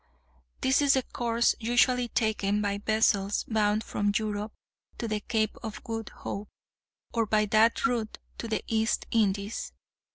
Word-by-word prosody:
This 265 +2 +3
is 280 -1 +5
the 265 - +1
course 235 -1 +1
usually 245 +1 +3
taken 215 -3 0
by 200 -1 -1
vessels 205 -2 +2
bound 215 -1 +1
from 205 0 0
Europe 210 0 -3 0.5
to 230 - -3
the 215 -1 -1
Cape 220 0 -1
of 220 -2 -7
Good 225 -2 -4
Hope, 205 +1 -6 0.6
or 230 -2 +1
by 215 0 +3
that 220 +5 +3
route 235 -5 -1 0.2
to 230 - -4
the 220 -2 -2
East 225 0 0
Indies. 205 -1 0
220 Hz, 150 wpm, -28 LUFS, 210-230 Hz, 0.6 s, is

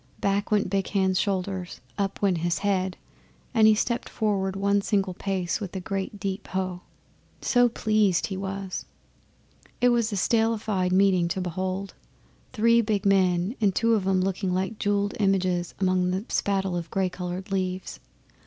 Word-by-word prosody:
Back 200 +1 0
went 210 -1 +2
Big 195 +1 -1
Hand's 190 -2 +1
shoulders, 190 -2 -2 0.2
up 200 0 -3
went 185 -4 +2
his 175 +1 0
head, 190 -2 0 0.6
and 220 -2 +6
he 215 - +6
stepped 235 +2 -1
forward 195 -3 -1
one 200 +1 +2
single 195 -2 0
pace 185 -2 -2
with 195 -2 -6
a - - -1
great 195 +2 -4
deep 195 0 -4
Hough! 185 -1 -2 0.6
so 245 -1 +3
pleased 215 -5 +2
he 195 - -4
was. 195 0 -4 0.9
That 245 0 +4
was 235 -2 +1
a - - -2
statelified 215 -3 +1
meeting 185 -2 +4
to 170 +2 -2
behold 185 +2 -3 0.6
three 230 0 +4
big 210 -3 -1
men, 185 +1 +2
and 195 -3 +2
two 230 0 +3
of 200 -4 +1
'em 190 -1 +3
looking 190 0 -1
like 190 +4 -2
jewelled 205 0 0
images 185 -3 +1
among 185 -1 +2
the 190 +4 -2
spattle 195 -2 0
of 170 -1 -4
gay 190 -1 0
coloured 180 +1 -5
leaves. 185 -1 -2
195 Hz, 160 wpm, -26 LUFS, 185-205 Hz, 0.9 s, and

